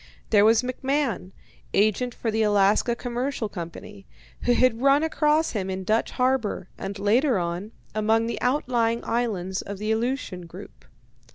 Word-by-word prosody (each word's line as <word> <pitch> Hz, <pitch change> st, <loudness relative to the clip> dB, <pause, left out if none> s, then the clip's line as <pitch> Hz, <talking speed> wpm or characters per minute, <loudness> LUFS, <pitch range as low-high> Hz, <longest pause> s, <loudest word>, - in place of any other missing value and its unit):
There 205 Hz, -2 st, +6 dB
was 225 Hz, +2 st, +5 dB
McMahon, 255 Hz, -5 st, -1 dB, 0.4 s
agent 215 Hz, +4 st, +2 dB
for 225 Hz, -, -2 dB
the 220 Hz, +1 st, 0 dB
Alaska 210 Hz, +2 st, +3 dB
Commercial 245 Hz, 0 st, -3 dB
Company, 195 Hz, +2 st, -9 dB, 0.4 s
who 245 Hz, -, +4 dB
had 245 Hz, -1 st, +2 dB
run 275 Hz, +2 st, +4 dB
across 310 Hz, 0 st, +2 dB
him 195 Hz, -4 st, -3 dB
in 190 Hz, 0 st, -3 dB
Dutch 215 Hz, +4 st, +1 dB
Harbour, 250 Hz, -7 st, 0 dB
and 195 Hz, +1 st, -6 dB
later 230 Hz, +5 st, +2 dB
on, 175 Hz, +4 st, -3 dB, 0.2 s
among 220 Hz, +1 st, +2 dB
the 230 Hz, -, -4 dB
outlying 240 Hz, -3 st, +1 dB
islands 195 Hz, -6 st, -1 dB
of 200 Hz, -, -7 dB
the 215 Hz, +2 st, -2 dB
Aleutian 220 Hz, -6 st, -2 dB
group. -, -, -12 dB
225 Hz, 150 wpm, -25 LUFS, 200-250 Hz, 0.4 s, There